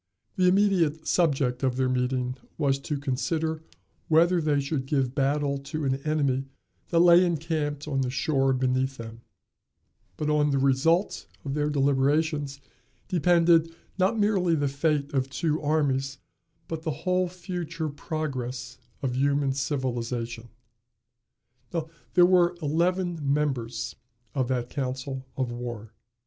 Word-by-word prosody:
The 185 -1 +3
immediate 180 -5 +2
subject 135 -7 +1
of 130 -2 +1
their 130 -1 +2
meeting 125 0 0 0.2
was 140 -3 +1
to 150 +1 -3
consider 155 +4 -1 0.5
whether 170 +2 +4
they 150 -2 +2
should 140 -1 -2
give 135 -3 0
battle 140 0 0
to 145 +2 -4
an 135 0 +1
enemy 140 -2 0 0.4
that 170 - +1
lay 175 +1 +7
encamped 155 -3 -2
on 135 -2 0
the 130 - -1
shore 135 +1 +1
beneath 130 +1 0
them; 115 0 -9 1.0
but 150 - -2
on 150 -1 +3
the 140 - +1
result 140 +8 +2 0.2
of 135 - -2
their 150 0 0
deliberations 145 +1 +1 0.5
depended, 170 -2 +3 0.2
not 195 +5 +2
merely 195 -5 +2
the 145 -2 +1
fate 145 +1 0
of 135 -1 0
two 155 +2 -1
armies, 140 -3 0 0.5
but 160 -1 -4
the 160 - -3 0.2
whole 185 0 +2
future 175 -3 -4
progress 130 -5 -4 0.2
of 125 -2 -1
human 140 0 +2
civilization. 120 -4 -3 1.7
There 175 -1 +8
were 175 -1 +4
eleven 175 +3 0
members 130 -6 -1 0.4
of 130 -2 0
that 125 -2 -1
council 130 -1 -4
of 130 -3 -1
war. 120 -2 -6
145 Hz, 130 wpm, -27 LUFS, 130-160 Hz, 1.7 s, There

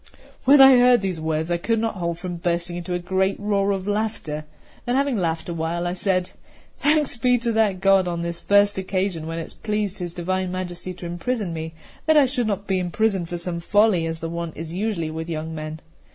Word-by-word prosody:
CIII - - -24 0.3
WHEN 275 +2 +8
I 265 -1 +9
heard 245 -2 +5
these 185 -5 -3
words, 160 +1 -1
I 175 - +2
could 225 +6 0
not 225 0 -1
hold 170 -4 -3
from 175 0 -5
bursting 175 0 -1
into 175 +1 -3
a - - +1
great 190 +2 0
roar 200 -1 +1
of 195 -2 -1
laughter; 205 -8 -2 0.4
then, 245 - +1
having 275 -1 +1
laughed 165 -5 -1
a 170 - -3
while, 165 +1 -2
I 175 - -1
said: 185 -1 0 0.4
"Thanks 300 -2 +2
be 250 +2 +3
to 235 0 -1
that 215 -4 +2
God 195 -2 +4
on 170 -1 -2
this 170 0 -4
first 205 -1 +3
occasion, 185 -3 -2
when 165 0 -4
it 165 - -3
has - - -11
pleased 210 -2 -3
His 175 -2 -5
Divine 185 +1 -2
Majesty 185 0 -5
to 175 - -9
imprison 175 +3 -2
me, 160 0 -5 0.4
I 300 -3 +6
should 250 -3 -1
not 200 -1 -2
be 190 -2 0
imprisoned 185 0 0
for 175 - -3
some 170 0 -3
folly, 200 -1 +3
as 165 0 -5
the 165 - -3
wont 170 -1 -5
is 165 +1 -6
usually 185 -5 -2
with 160 +1 -5
young 160 0 -4
men. 155 0 -6
185 Hz, 225 wpm, -23 LUFS, 170-210 Hz, 0.4 s, I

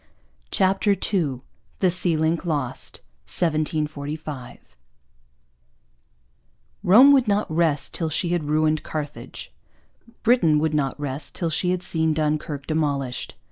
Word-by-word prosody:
CHAPTER 195 +1 +2 0.2
II 145 -10 0 0.4
THE 185 -2 +2
SEA 175 -2 +1
LINK 160 +1 0
LOST 145 -8 -4 0.3
1745 150 - -3 2.1
Rome 245 +10 +8
would 265 -4 +4
not 205 -3 0
rest 160 -4 +1
till 165 -2 -2
she 170 +3 -1
had 175 -3 0
ruined 155 +1 +1
Carthage. 150 -2 -7 0.7
Britain 195 -11 +4
would 155 +1 0
not 145 -2 -1
rest 145 0 -4
till 170 -2 -1
she 180 +3 0
had 180 0 -1
seen 160 -2 0
Dunkirk 150 -2 -2
demolished. 140 -5 -2
155 Hz, 115 wpm, -23 LUFS, 150-175 Hz, 2.1 s, Rome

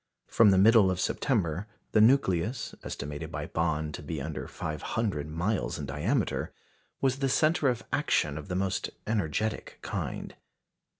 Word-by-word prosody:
From 115 -2 +5
the 95 - +5
middle 105 0 +6
of 95 -1 -1
September, 95 - 0 0.2
the 105 - +5
nucleus, 110 -2 +3
estimated 75 +1 -5
by - - -4
Bond 80 -2 -1
to - - -6
be 75 +1 -4
under 75 +2 -5
five 75 -1 -5
hundred 100 -10 -1
miles 90 +7 -1
in - - -4
diameter, 95 - -1 0.5
was 135 0 +1
the 135 -1 +1
centre 155 +2 +3
of 120 -3 -2
action 75 -2 +1
of 80 - -7
the 90 - -3
most 95 0 -1 0.2
energetic 105 0 -1
kind. - - -4
95 Hz, 155 wpm, -29 LUFS, 80-115 Hz, 0.5 s, middle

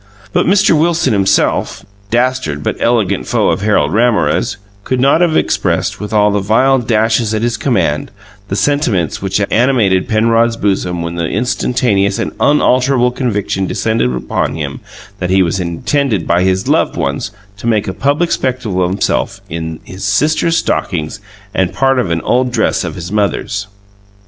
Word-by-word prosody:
But - - +2
Mr. 195 -1 +4
Wilson 160 -4 +2
himself, 95 -2 +1 0.2
dastard 120 - 0
but - - -1
eloquent 110 -5 0
foe - - +1
of - - -2
Harold 105 -1 +1
Ramorez, 115 -2 +1 0.3
could 130 +4 -1
not 140 +6 +3
have 170 -3 +3
expressed, - - 0
with 105 -1 -6
all 105 -1 +3
the 100 - +1
vile 120 +7 +3
dashes 110 -1 +1
at 110 - -2
his 120 0 0
command, 85 - 0 0.4
the 95 - -3
sentiments 120 - 0
which 95 +1 -1
animated 115 -7 +2
Penrod's 115 +1 +2
bosom 90 -5 -1
when 85 0 -4
the 85 - -1
instantaneous 110 -3 0
and - - -2
unalterable 130 -3 +3
conviction 105 -6 -2
descended 110 - 0
upon 60 - -2
him 70 -3 -5 0.4
that 90 - -2
he 95 0 +4
was 85 +2 -1
intended 95 - -1
by 85 +1 +2
his 95 0 0
loved - - +1
ones 70 +9 -2 0.3
to 110 - -6
make 110 -3 +1
a 95 - -2
public 145 - 0
spectacle 120 -8 -1
of 90 - 0
himself 95 - -1
in 80 -1 -5
his 95 +1 -9
sister's 155 +11 +1
stockings 85 +1 -2 0.3
and 95 -3 0
part 135 -1 +2
of 105 - -1
an 85 -1 -1
old 125 +1 +1
dress 110 -4 0
of 80 -3 -5
his 90 +1 -7
mother's. 105 0 -1
105 Hz, 165 wpm, -14 LUFS, 95-125 Hz, 0.4 s, Mr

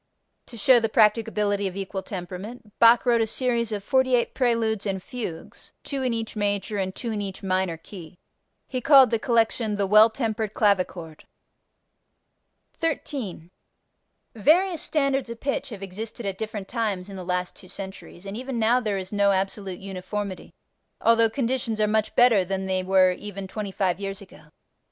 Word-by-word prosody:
To 235 - -10
show 245 +3 +5
the 225 -1 -1
practicability 210 -2 +2
of 185 - -6
equal 195 0 -4
temperament 200 +5 -8
Bach 230 +1 +6
wrote 235 -2 +3
a 225 - +1
series 235 -1 0
of 205 -2 -3
48 260 0 +2
preludes 230 -5 0
and 195 -1 -1
fugues, 230 -11 -7
two 275 -2 -3
in 255 -1 0
each 225 -1 -4
major 205 0 -1
and 190 -1 -2
two 235 - -4
in 210 -1 -2
each 195 -1 -6
minor 185 -3 0
key. 175 0 -12 0.5
He 255 -1 -3
called 270 -3 +7
the 230 - +1
collection 225 -2 +1
"The 200 -1 0
Well 215 +3 +7
tempered 220 -2 -3
Clavichord." 185 -6 0 1.5
13. 265 - -4 0.8
Various 335 - +3
standards 275 -4 0
of 235 0 -7
pitch 275 0 -2
have 205 -4 -8
existed 215 +4 -7
at 195 -1 -4
different 215 -3 -5
times 210 -6 -2
in 200 - -9
the 185 - -6
last 180 0 -2
two 185 - -13
centuries, 190 -1 -9
and 195 +1 -6
even 255 +1 -4
now 230 +2 +3
there 210 -5 -2
is 190 -1 -6
no 200 -1 +3
absolute 190 -1 -2
uniformity 195 0 -6 0.4
although 230 0 +4
conditions 235 -2 -2
are 215 - +4
much 215 0 0
better 240 -6 +5
than 190 +1 -3
they 190 -1 0
were 185 0 +4
even 195 +1 -7
twenty 205 0 -5
five 190 -1 0
years 195 -1 -4
ago. 200 -3 -15
210 Hz, 170 wpm, -25 LUFS, 190-235 Hz, 1.5 s, called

